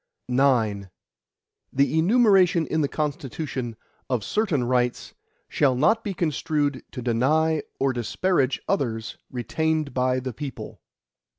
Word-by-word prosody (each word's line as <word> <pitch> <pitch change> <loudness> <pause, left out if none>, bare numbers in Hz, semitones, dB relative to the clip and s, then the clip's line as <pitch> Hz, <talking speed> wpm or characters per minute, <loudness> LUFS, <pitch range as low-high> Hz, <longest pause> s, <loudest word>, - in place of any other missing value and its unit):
IX 120 -6 +2 0.8
The 140 +4 +2
enumeration 190 -3 +4
in 160 +1 0
the 145 - +2
Constitution, 140 -4 -4 0.3
of 125 -5 0
certain 185 - 0
rights, 125 0 0 0.3
shall 135 -4 +2
not 220 - +3
be 200 -3 -4
construed 150 -4 -1
to 125 - -6
deny 150 +7 +2 0.2
or 135 -1 +1
disparage 135 - 0
others 115 -5 -2
retained 155 +4 -1
by 130 0 +1
the 130 -1 -5
people. 140 +2 -7
140 Hz, 115 wpm, -24 LUFS, 125-160 Hz, 0.8 s, enumeration